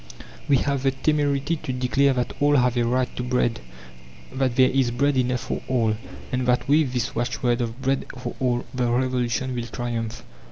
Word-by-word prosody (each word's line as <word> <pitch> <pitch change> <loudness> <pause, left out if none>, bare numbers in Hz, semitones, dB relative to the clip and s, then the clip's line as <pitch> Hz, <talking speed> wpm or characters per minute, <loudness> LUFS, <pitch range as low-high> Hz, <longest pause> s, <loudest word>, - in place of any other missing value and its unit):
We 140 - +6
have 140 0 0
the 135 - +3
temerity 145 +2 0
to 135 - -5
declare 130 +2 +2
that 125 -1 -2
all 145 +1 +4
have 125 -2 +3
a 120 -1 +2
right 125 +1 0
to - - -3
bread, 125 -2 0 0.7
that 130 -2 0
there 130 0 +5
is 130 -2 +2
bread 140 +4 +1
enough 125 -1 +1
for - - -4
all, 115 -4 +1 0.4
and 125 0 -1
that 125 0 +2
with 145 -2 +3
this 120 -2 -1
watchword 120 +1 0
of 115 +1 -4
Bread 135 +1 0
for 125 - -5
All 125 -2 0
the 125 -2 0
Revolution 125 0 0
will 120 -1 -3
triumph. 115 -1 -4
125 Hz, 190 wpm, -24 LUFS, 120-135 Hz, 0.7 s, We